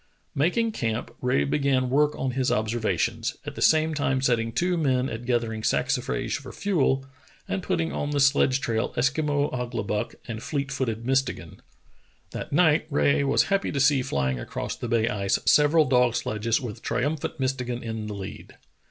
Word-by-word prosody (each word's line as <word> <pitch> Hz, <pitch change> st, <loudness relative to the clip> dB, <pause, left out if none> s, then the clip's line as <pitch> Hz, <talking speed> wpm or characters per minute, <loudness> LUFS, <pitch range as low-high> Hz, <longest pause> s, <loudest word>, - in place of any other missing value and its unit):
Making 220 Hz, +11 st, +1 dB
camp, 115 Hz, -, -3 dB
Rae 125 Hz, -, +2 dB
began 130 Hz, -, +1 dB
work 150 Hz, +2 st, +2 dB
on 130 Hz, -, -1 dB
his 130 Hz, +1 st, 0 dB
observations, 115 Hz, +2 st, -1 dB
at 145 Hz, -, -5 dB
the -, -, -8 dB
same 160 Hz, 0 st, +4 dB
time 140 Hz, -3 st, 0 dB
setting 120 Hz, -3 st, +1 dB
two 175 Hz, +9 st, 0 dB
men 130 Hz, -5 st, +1 dB
at 115 Hz, 0 st, -6 dB
gathering 115 Hz, -3 st, 0 dB
saxi -, -, +1 dB
frage -, -, -2 dB
for -, -, -10 dB
fuel, 140 Hz, -9 st, 0 dB, 0.4 s
and 195 Hz, -, -2 dB
putting 170 Hz, -3 st, -1 dB
on 145 Hz, -, -2 dB
the 145 Hz, -1 st, 0 dB
sledge 140 Hz, -1 st, +3 dB
trail 115 Hz, -3 st, -1 dB
Eskimo 145 Hz, +2 st, +1 dB
Ouglibuck 120 Hz, -4 st, -3 dB
and 115 Hz, -2 st, -5 dB
fleet 140 Hz, 0 st, -3 dB
footed 115 Hz, -5 st, -2 dB
Mistegan. 135 Hz, +1 st, -1 dB, 0.7 s
That -, -, -6 dB
night 155 Hz, 0 st, +3 dB
Rae 140 Hz, -1 st, +2 dB
was 140 Hz, -, +3 dB
happy 195 Hz, 0 st, +1 dB
to 140 Hz, -, -2 dB
see 135 Hz, 0 st, +4 dB
flying 65 Hz, -, -1 dB
across -, -, -4 dB
the -, -, -5 dB
bay 115 Hz, -1 st, +2 dB
ice 100 Hz, -3 st, 0 dB
several 150 Hz, +2 st, +5 dB
dog 125 Hz, -2 st, +3 dB
sledges 110 Hz, +2 st, 0 dB
with 120 Hz, -3 st, -7 dB
triumphant 145 Hz, +4 st, -2 dB
Mistegan 125 Hz, -2 st, -2 dB
in 110 Hz, -2 st, -4 dB
the 105 Hz, -, -5 dB
lead. 95 Hz, -1 st, -9 dB
130 Hz, 170 wpm, -25 LUFS, 115-145 Hz, 0.7 s, several